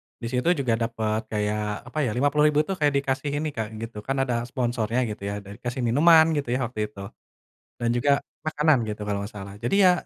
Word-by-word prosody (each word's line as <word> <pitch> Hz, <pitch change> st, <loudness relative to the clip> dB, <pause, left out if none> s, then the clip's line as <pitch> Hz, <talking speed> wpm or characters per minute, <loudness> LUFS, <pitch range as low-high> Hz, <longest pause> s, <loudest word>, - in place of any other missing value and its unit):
di 115 Hz, -, -6 dB
situ 125 Hz, +3 st, 0 dB, 0.2 s
juga 120 Hz, -3 st, +1 dB
dapet 110 Hz, -2 st, -1 dB
kayak 105 Hz, +1 st, -2 dB
apa 155 Hz, -, -2 dB
ya, 125 Hz, -, 0 dB
Rp50.000 150 Hz, +2 st, +3 dB
tuh 195 Hz, -, -1 dB
kayak 145 Hz, -1 st, +3 dB
dikasih 140 Hz, +1 st, -2 dB
ini, 155 Hz, -, -1 dB
Kak, 110 Hz, -1 st, -2 dB
gitu, 115 Hz, -1 st, -7 dB
kan 135 Hz, -, -2 dB
ada 120 Hz, -3 st, -1 dB
sponsornya 120 Hz, -2 st, -1 dB
gitu 105 Hz, -2 st, -6 dB
ya, 100 Hz, 0 st, -3 dB
ada 100 Hz, 0 st, -13 dB
dikasih 120 Hz, +3 st, -5 dB
minuman 160 Hz, +6 st, +7 dB
gitu 140 Hz, -5 st, -2 dB
ya, -, -, 0 dB
waktu 115 Hz, -2 st, -8 dB
itu, 100 Hz, -, -13 dB, 0.8 s
dan 120 Hz, -, -1 dB
juga 130 Hz, +4 st, +2 dB, 0.3 s
makanan 155 Hz, -2 st, +3 dB
gitu, 105 Hz, 0 st, -5 dB
kalau 100 Hz, -1 st, -1 dB
nggak 100 Hz, +2 st, -7 dB
salah. 100 Hz, 0 st, -8 dB
Jadi 120 Hz, +11 st, 0 dB
ya 180 Hz, -, +8 dB
120 Hz, 210 wpm, -25 LUFS, 110-140 Hz, 0.8 s, ya